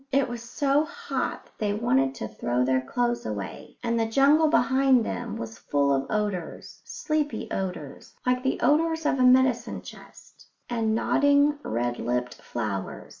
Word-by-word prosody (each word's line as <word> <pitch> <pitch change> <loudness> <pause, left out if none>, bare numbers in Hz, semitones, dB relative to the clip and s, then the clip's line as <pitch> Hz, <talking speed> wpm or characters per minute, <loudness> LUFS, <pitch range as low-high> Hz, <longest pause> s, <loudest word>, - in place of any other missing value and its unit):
It 275 0 +2
was 240 -1 -6
so 275 +5 +1
hot 335 +3 -4
that - - -25
they 205 -1 0
wanted 135 - +1
to 110 - -5
throw 120 +3 -1
their 130 0 +2
clothes 240 - -1
away, 105 -3 -6
and 235 -1 0
the 225 - +1
jungle 285 +7 +4
behind 260 -1 +3
them - - -4
was 115 0 -7
full 140 -1 +1
of 135 0 -1
odours 205 -5 -3
sleepy 305 - -2
odours, 180 -7 -5
like 250 0 +2
the 265 0 -1
odours 320 +1 +2
of 270 - +1
a - - +4
medicine 250 -2 +3
chest - - -14 0.2
and 225 -2 0
nodding, 285 +4 +3
red 120 - -2
lipped 125 0 -1
flowers. 105 -5 -5
235 Hz, 160 wpm, -26 LUFS, -, 0.2 s, jungle